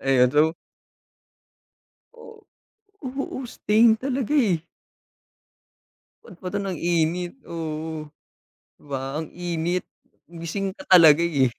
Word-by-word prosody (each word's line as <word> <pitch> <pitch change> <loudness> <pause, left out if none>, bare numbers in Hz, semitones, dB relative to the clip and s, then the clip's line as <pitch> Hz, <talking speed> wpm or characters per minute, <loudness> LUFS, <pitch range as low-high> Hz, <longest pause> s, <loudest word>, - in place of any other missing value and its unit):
Ayun 130 -2 +3
so. 155 +3 +3 1.6
Oh, 460 -2 -14 0.6
oo, 265 +1 -4
stain 225 -1 +3
talaga 270 -1 -2
eh. 190 - +2 1.6
Ba't 175 - -14
pa 185 - -8
'to 200 - -1
nag-init 175 -1 -1 0.2
oo, 160 -1 -5 0.7
'di - - -27
ba 135 - -1 0.2
ang - - -12
init, 175 0 -2 0.4
gising 175 +4 -4
ka - - -11
talaga 165 -3 +8
eh. 145 -6 +2
170 Hz, 105 wpm, -24 LUFS, 160-205 Hz, 1.6 s, talaga